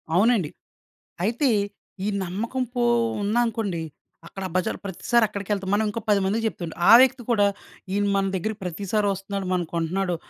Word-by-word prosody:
అవునండి. 205 -4 +3 0.7
అయితే 240 +6 +1 0.6
ఈ - - 0 0.2
నమ్మకం 225 +8 -2
పో 245 - +1 0.4
ఉందనుకోండి 215 -4 0 0.5
అక్కడ 195 - -8
బజార్ 185 - 0
ప్రతిసారి 235 +5 +1
అక్కడికేళ్తాం. 200 -1 -3
మనం 210 +2 +3
ఇంకో 220 - -3
పదిమందికి 205 +2 +2
చెప్తుమండి. 175 -6 -5
ఆ - - +10
వ్యక్తి 260 -1 +3
కూడా 205 -3 +4 0.5
ఈయన 205 +1 +1
మన 195 0 +2
దగ్గరకి 215 +4 -3
ప్రతిసారి 200 +4 -1
వస్తున్నాడు, 195 0 -4
మన 180 -1 +1
కొంటున్నాడు 175 +2 -1
200 Hz, 140 wpm, -24 LUFS, 190-225 Hz, 0.7 s, ఆ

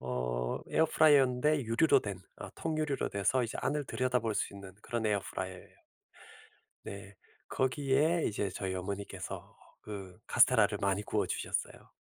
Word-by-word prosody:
어 60 -1 -2
에어프라이어인데 150 -2 +4
유리로 115 +8 +4
된 100 -3 -5 0.2
어 - - -7
통유리로 155 -3 -1
돼서 100 +6 +1
이제 115 - -5
안을 145 +2 -1
들여다볼 125 -4 0
수 - - -1
있는 100 -2 -10
그런 115 -2 -2
에어프라이어에요. 95 -3 -4 1.0
네. 100 0 -9 0.3
거기에 140 +5 +1
이제 100 -2 -1
저희 95 0 -3
어머니께서 100 +2 -6 0.2
그 95 -4 -8
카스텔라를 - - +4
많이 100 +1 +1
구워주셨어요. - - -2
105 Hz, 340 characters per minute, -32 LUFS, 95-135 Hz, 1.0 s, 에어프라이어인데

